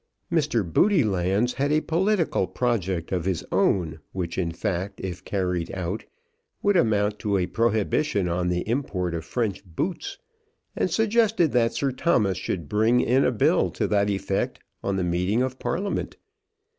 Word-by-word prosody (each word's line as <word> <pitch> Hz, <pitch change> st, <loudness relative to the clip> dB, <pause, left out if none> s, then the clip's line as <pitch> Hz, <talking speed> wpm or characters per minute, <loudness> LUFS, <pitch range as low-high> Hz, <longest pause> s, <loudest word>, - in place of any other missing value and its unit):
Mr. 150 Hz, -9 st, +1 dB
Roodylands 110 Hz, -, +3 dB
had 140 Hz, +1 st, 0 dB
a 155 Hz, -, +4 dB
political 175 Hz, +3 st, +1 dB
project 95 Hz, -9 st, -1 dB
of 90 Hz, -3 st, -1 dB
his 95 Hz, -3 st, -1 dB
own, 80 Hz, -4 st, +1 dB
which 85 Hz, -3 st, -3 dB
in 85 Hz, -3 st, -1 dB
fact, 90 Hz, +3 st, -3 dB
if 90 Hz, -2 st, -5 dB
carried 90 Hz, -4 st, -2 dB
out, 90 Hz, +3 st, -3 dB, 0.6 s
would 205 Hz, -1 st, +3 dB
amount 105 Hz, -, +2 dB
to 100 Hz, -2 st, 0 dB
a 90 Hz, -, +1 dB
prohibition 110 Hz, 0 st, +1 dB
on 90 Hz, +1 st, 0 dB
the 90 Hz, 0 st, 0 dB
import 105 Hz, -8 st, -1 dB
of 80 Hz, -1 st, -3 dB
French 105 Hz, +3 st, -2 dB
boots, 105 Hz, -, -4 dB, 0.6 s
and -, -, 0 dB
suggested 220 Hz, -6 st, +2 dB
that 115 Hz, -2 st, +2 dB
Sir 140 Hz, -1 st, 0 dB
Thomas 120 Hz, -, +1 dB
should 85 Hz, -6 st, -3 dB
bring 110 Hz, +6 st, +3 dB
in 130 Hz, +3 st, +3 dB
a -, -, +3 dB
bill 115 Hz, -, +2 dB
to -, -, -2 dB
that 100 Hz, 0 st, +2 dB
effect 100 Hz, -1 st, -1 dB, 0.2 s
on 100 Hz, -, 0 dB
the 95 Hz, -, 0 dB
meeting 90 Hz, +7 st, +1 dB
of 130 Hz, 0 st, -4 dB
Parliament. 175 Hz, +12 st, -2 dB
105 Hz, 155 wpm, -25 LUFS, 90-130 Hz, 0.6 s, a